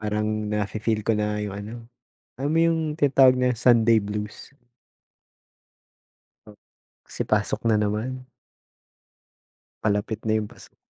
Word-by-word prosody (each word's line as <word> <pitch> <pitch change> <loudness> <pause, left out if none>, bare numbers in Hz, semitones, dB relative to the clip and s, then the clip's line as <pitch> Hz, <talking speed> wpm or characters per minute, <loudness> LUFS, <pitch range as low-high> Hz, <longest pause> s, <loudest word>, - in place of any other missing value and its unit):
Parang 105 0 -1 0.2
na 105 -1 -1
fi-feel 110 +1 -1
ko 110 0 0
na 105 0 -1
'yong 105 -2 -4
ano, 105 +3 -7 0.7
alam 145 +3 -1
mo - - +4
'yong 160 -2 0
tinatawag 135 -4 +5
na 125 0 +2
Sunday 115 -1 +4
blues. 105 +6 -6 2.5
Kasi - - -4
pasok - - 0
na 105 - +3
naman. 115 +5 -2 1.6
Palapit 105 +1 -1
na 110 0 +1
'yong 105 -1 -4
pasok. - - -16
110 Hz, 120 wpm, -24 LUFS, 105-125 Hz, 2.5 s, tinatawag